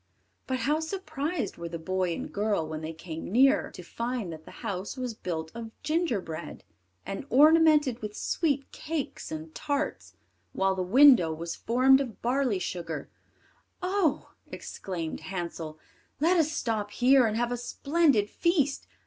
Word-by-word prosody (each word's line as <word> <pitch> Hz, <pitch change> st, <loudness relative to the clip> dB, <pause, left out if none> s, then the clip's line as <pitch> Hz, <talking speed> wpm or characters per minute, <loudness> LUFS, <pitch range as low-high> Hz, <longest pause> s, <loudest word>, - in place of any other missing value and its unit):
But 260 Hz, -2 st, -1 dB
how 295 Hz, +5 st, +2 dB
surprised 320 Hz, -3 st, -3 dB
were 170 Hz, 0 st, -5 dB
the 170 Hz, -, -4 dB
boy 185 Hz, +2 st, -1 dB
and -, -, -6 dB
girl, 205 Hz, -6 st, 0 dB
when 155 Hz, 0 st, -5 dB
they 160 Hz, 0 st, -4 dB
came 165 Hz, +1 st, -7 dB
nearer, 270 Hz, +6 st, +4 dB
to 180 Hz, -, -10 dB
find 230 Hz, -2 st, -3 dB
that 155 Hz, 0 st, -11 dB
the -, -, -11 dB, 0.2 s
house 195 Hz, +6 st, -4 dB
was 250 Hz, -2 st, -3 dB
built 160 Hz, -6 st, -4 dB
of 230 Hz, -1 st, -6 dB
gingerbread, 245 Hz, -, -2 dB, 0.4 s
and 195 Hz, +8 st, -5 dB
ornamented 300 Hz, -2 st, +5 dB
with 210 Hz, -1 st, -6 dB
sweet 285 Hz, -5 st, -1 dB
cakes 310 Hz, -3 st, -4 dB
and 155 Hz, 0 st, -6 dB
tarts, 290 Hz, 0 st, -3 dB, 0.4 s
while 190 Hz, 0 st, +2 dB
the 190 Hz, -, -2 dB
window 230 Hz, -, +6 dB
was 165 Hz, +1 st, -4 dB
formed 260 Hz, +3 st, +4 dB
of 245 Hz, -6 st, -6 dB
barley 250 Hz, -3 st, +1 dB
sugar. 170 Hz, -4 st, -4 dB, 0.7 s
"Oh!" 370 Hz, -5 st, 0 dB, 0.2 s
exclaimed 170 Hz, -4 st, -5 dB
Hansel, 170 Hz, -4 st, -5 dB, 0.4 s
"let 335 Hz, +5 st, +4 dB
us 315 Hz, -3 st, +3 dB
stop 220 Hz, -8 st, -2 dB
here 250 Hz, +3 st, +4 dB
and 215 Hz, 0 st, -1 dB
have 240 Hz, +1 st, 0 dB
a -, -, 0 dB
splendid 275 Hz, -2 st, +2 dB
feast. 290 Hz, -, 0 dB
235 Hz, 150 wpm, -28 LUFS, 180-285 Hz, 0.7 s, window